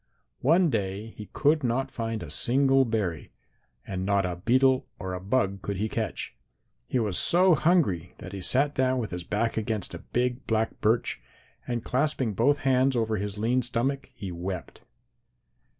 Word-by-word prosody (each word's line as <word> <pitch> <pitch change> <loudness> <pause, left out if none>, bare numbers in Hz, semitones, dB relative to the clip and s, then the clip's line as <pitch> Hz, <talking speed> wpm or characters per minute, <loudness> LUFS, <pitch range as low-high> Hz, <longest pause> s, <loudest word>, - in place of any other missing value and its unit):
"One 165 +4 +4
day 105 0 -3
he 105 - -9
could 150 +1 +2
not 125 +2 0
find 115 -1 -3
a - - -8
single 135 +1 +4
berry 105 -9 -2 0.5
and 95 -1 -4
not 100 0 +2
a 90 -1 -3
beetle 130 +7 +3
or 95 -1 -5
a 90 - -3
bug 100 -1 0
could 100 -2 -3
he 105 +3 0
catch. - - -4 0.5
He - - 0
was 105 -7 0
so 180 +1 +5
hungry 150 - +2
that 95 - -9
he 100 - -5
sat 140 +9 +2
down 130 -1 +1
with 115 -5 -3
his 90 -1 -4
back 110 +6 -1
against 110 -2 -2
a - - -6
big 125 +1 -2
black 110 0 -1
birch, 115 +3 +1 0.5
and 120 -2 -3
clasping 130 -4 0
both 135 +8 +3
hands 130 0 +3
over 110 -2 0
his 100 +1 -4
lean 120 +4 +1
stomach, 125 +3 -2
he 95 -3 -6
wept. 90 +1 -6
115 Hz, 170 wpm, -27 LUFS, 100-130 Hz, 0.5 s, so